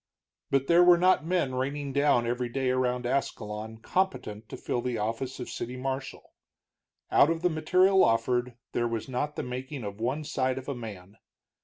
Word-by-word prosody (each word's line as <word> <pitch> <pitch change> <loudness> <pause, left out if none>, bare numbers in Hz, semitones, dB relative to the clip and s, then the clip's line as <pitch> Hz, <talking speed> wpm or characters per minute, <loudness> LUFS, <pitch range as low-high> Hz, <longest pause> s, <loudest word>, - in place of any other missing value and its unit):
But 135 -1 +2
there 170 +4 +6
were 175 -1 +7
not 180 -3 +3
men 175 -7 +1
raining 140 +2 -2
down 140 -4 +3
every 120 +1 -1
day 130 +1 0
around 125 -1 0
Ascalon 110 -4 -3
competent 110 - -2
to - - -7
fill 120 - -2
the 125 -1 -2
office 115 +5 -3
of 125 - -5
city 125 +2 -5
marshal. 135 +1 -5 0.8
Out 145 - +6
of 165 0 -1
the 180 - +3
material 185 +5 +4
offered 120 +1 +1 0.2
there 120 - 0
was 115 -2 -3
not 140 +3 -2
the - - -3
making 130 +2 -5
of 100 0 -6
one 130 +6 -1
side 130 -3 -1
of 130 - -7
a 140 - -1
man. 105 -5 -9
130 Hz, 180 wpm, -28 LUFS, 120-145 Hz, 0.8 s, were